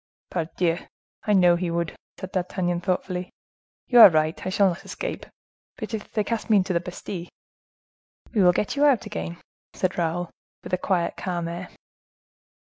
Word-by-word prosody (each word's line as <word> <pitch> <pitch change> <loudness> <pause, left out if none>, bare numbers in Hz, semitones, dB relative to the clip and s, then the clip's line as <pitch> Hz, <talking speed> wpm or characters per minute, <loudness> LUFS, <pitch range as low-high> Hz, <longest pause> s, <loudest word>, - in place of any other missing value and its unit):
"Pardieu! 170 0 0 0.5
I 210 - +4
know 180 -3 +6
he 175 0 -2
would," 170 0 -2 0.2
said 190 - -6
D'Artagnan 175 -1 -1
thoughtfully. 180 0 -2 0.6
"You 245 - +5
are 225 - +12
right, 155 -1 0
I - - -2
shall 195 +1 +4
not 175 - -5
escape. - - -5 0.5
But 225 -2 -6
if 215 -1 -5
they 215 - 0
cast 230 +2 -3
me 215 - +6
into 185 -1 +1
the 170 - +2
Bastile?" 180 0 -7 1.1
"We 215 - +3
will 180 -1 +7
get 200 +8 -1
you 285 - +2
out 275 -7 +4
again," 85 +1 -5 0.4
said 185 -1 -1
Raoul, 175 +1 -1 0.3
with - - -9
a - - +4
quiet, 180 -3 0
calm 175 -3 -3
air. 175 +2 -6
180 Hz, 170 wpm, -25 LUFS, 170-200 Hz, 1.1 s, are